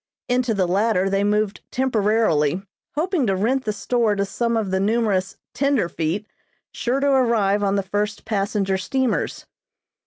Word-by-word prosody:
Into 245 -2 +1
the 185 -2 +1
latter 195 0 +1
they 195 0 +1
moved 210 0 0
temporarily, 210 - +1 0.3
hoping 320 - 0
to 195 - +2
rent 255 +7 0
the 215 - 0
store 225 0 0
to 200 0 0
some 235 +3 -1
of 210 -4 -1
the 190 - +1
numerous 205 -2 0 0.2
"tenderfeet" 205 - 0 0.5
sure 250 +3 -1
to 280 +1 +2
arrive 225 -6 +2
on 200 -1 +1
the 200 - 0
first 205 +2 -2
passenger 200 -2 0
steamers. 260 +5 -1
210 Hz, 150 wpm, -22 LUFS, 195-235 Hz, 0.5 s, to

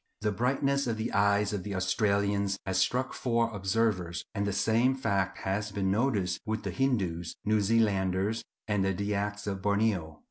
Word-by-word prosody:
The 105 0 +1
brightness 135 +5 +1
of 115 -2 -1
the 110 +1 -3
eyes 100 +1 +3
of 100 - -2
the 100 +1 -5
Australians 100 +1 +1
has 95 -1 0
struck 125 +7 +1
four 115 -2 0
observers, 95 -4 0
and 100 -2 -1
the - - 0
same 115 +6 +2
fact 100 -7 0
has 100 +2 -2
been 95 -1 0
noticed 100 -6 0
with 110 +1 -3
Hindoos, 95 -11 -1
New 110 0 +3
Zealanders, 100 -1 +1 0.2
and 105 -2 +1
the 95 -1 0
Dyaks 105 +1 -2
of 95 -2 -3
Borneo. 100 -6 0
100 Hz, 165 wpm, -29 LUFS, 95-110 Hz, 0.2 s, eyes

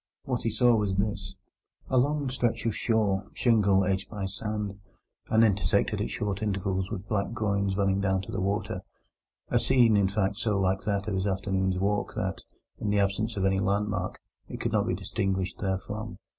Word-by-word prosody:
What 125 -4 -2
he 115 - 0
saw 120 +2 +4
was 105 -3 0
this: 100 -1 -2 0.5
A 130 - +3
long 145 +2 +1
stretch 120 -3 0
of 115 - 0
shore—shingle 100 -1 +2
edged 95 0 -1
by 105 -3 -4
sand, 105 0 -4 0.5
and 110 +1 +5
intersected 100 -3 +2
at - - -1
short 100 -1 -2
intervals 95 -2 -1
with 95 +2 -5
black 100 -2 0
groynes 100 -3 0
running 100 -1 +2
down 95 -1 +1
to - - -8
the 95 - -2
water—a 100 +2 -4
scene, 120 -4 +4
in 100 -2 +4
fact, 100 0 0
so 105 -3 0
like 95 0 +1
that 100 0 -1
of 105 - -1
his 95 +1 0
afternoon's 95 -1 0
walk 100 +2 0
that, - - -2 0.4
in 105 - -2
the 105 - +2
absence 100 +3 0
of 95 - +1
any 95 0 +2
landmark, 100 -1 -1 0.3
it - - -6
could - - -1
not - - +1
be - - +1
distinguished 95 -1 -2
therefrom. 105 +3 -3
100 Hz, 180 wpm, -28 LUFS, 95-110 Hz, 0.5 s, and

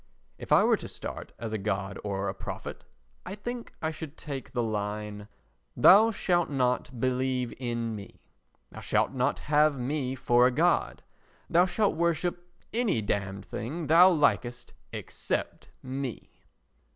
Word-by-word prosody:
If - - -9
I - - +7
were - - +4
to - - -8
start - - -7
as 115 -2 -5
a 110 - -1
god 100 -1 -2
or 100 -1 -2
a 95 - -1
prophet, - - -7 0.4
I 195 - -6
think 240 +3 -6
I 160 - 0
should 155 -1 -8
take 140 -5 -6
the 120 -1 0
line: 105 -1 -3 0.5
"Thou 210 +4 +8
shalt 175 -5 +1
not 125 -2 0
believe 130 0 0
in 120 -3 -2
me. 100 -1 -10 0.5
Thou - - -9
shalt - - +1
not 130 +1 0
have 150 -1 +3
me 130 +1 -2
for 120 -1 +4
a - - +1
god. 125 - +1 0.5
Thou 175 +2 +5
shalt 200 0 +1
worship 170 +1 -1 0.2
any 220 - +1
damned 100 -1 -2
thing 150 +10 -5
thou 170 +5 +7
likest 130 -7 +1 0.2
except - - -4
me." 130 -2 -5
130 Hz, 150 wpm, -28 LUFS, 110-165 Hz, 0.5 s, Thou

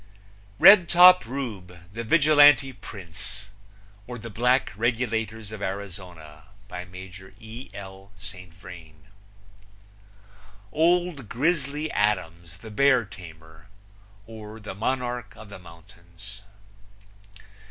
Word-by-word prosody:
Redtop 180 - +7
Rube, 105 -9 -6
the 115 +2 -5
Vigilante 145 0 +5
Prince; 100 -1 -8 0.6
or, 125 0 -7
The 115 0 -9
Black 125 +5 +1
Regulators 110 -2 -2
of 110 -1 -8
Arizona. 90 -6 -8 0.2
By 90 -3 -7
Major 95 +1 -12
E. 115 +3 -10
L. 95 0 -11
St. 95 -2 -11
Vrain. 80 -3 -14 1.7
Old 170 - +1
Grizzly 150 +1 -1
Adams, 85 -5 -2
the 110 +2 -12
Bear 130 +1 +3
Tamer; 80 -4 -14 0.6
or, 110 0 -11
The 105 -2 -8
Monarch 120 0 -3
of 110 -1 -13
the 100 - -10
Mountains. 85 +4 -16
105 Hz, 100 wpm, -25 LUFS, 90-125 Hz, 1.7 s, Redtop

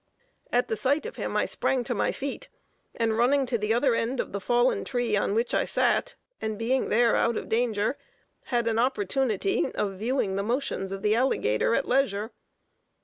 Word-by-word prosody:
At 245 +1 +2
the 220 - -1
sight 270 - 0
of 470 - -7
him, - - -2
I - - +2
sprang 255 -2 0
to 245 - -2
my 210 - 0
feet, 275 0 -5 0.5
and 225 -1 0
running 270 +3 +3
to 250 -1 -1
the 210 +1 -1
other 245 +2 +3
end 235 +3 -1
of - - -2
the 200 - -4
fallen 240 +4 +2
tree 245 -4 -1
on 200 0 0
which 230 +2 0
I - - +3
sat, - - +1 0.3
and 220 -1 -3
being 250 +4 0
there 235 +1 +3
out 235 -1 +1
of - - -5
danger, 225 +1 0 0.5
had 240 -2 0
an 225 0 +1
opportunity 215 -6 0
of 195 -2 -2
viewing 220 -4 0
the - - 0
motions 220 -4 -2
of 195 0 -5
the 210 - +3
alligator 230 - +1
at 275 - 0
leisure. 225 -4 +1
235 Hz, 195 wpm, -27 LUFS, 210-255 Hz, 0.5 s, running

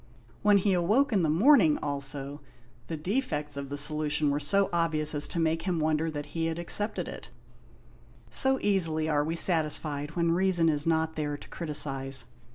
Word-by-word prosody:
When 205 -1 +4
he 195 0 +1
awoke 215 +10 +1
in 195 - +2
the 160 - 0
morning, 180 - +4
also, 140 0 -5 0.5
the 165 - -5
defects 155 - -3
of 140 -1 -6
the 145 - -5
solution 150 0 +2
were 145 - -1
so 195 +7 +2
obvious 160 -3 +1
as 145 -1 0
to - - -6
make 165 0 0
him 175 -1 -2
wonder 155 +1 0
that 145 -2 -6
he 165 -1 -1
had 165 0 -3
accepted 205 +5 -2
it; - - -9 1.0
so 265 0 +4
easily 165 -6 +1
are 150 -2 +1
we 160 +2 -3
satisfied 155 -3 -1
when 170 -1 +1
reason 175 -2 +3
is 150 0 0
not 160 -1 0
there 145 -2 -3
to - - -14
criticise. 135 -4 -2
160 Hz, 175 wpm, -28 LUFS, 150-175 Hz, 1.0 s, When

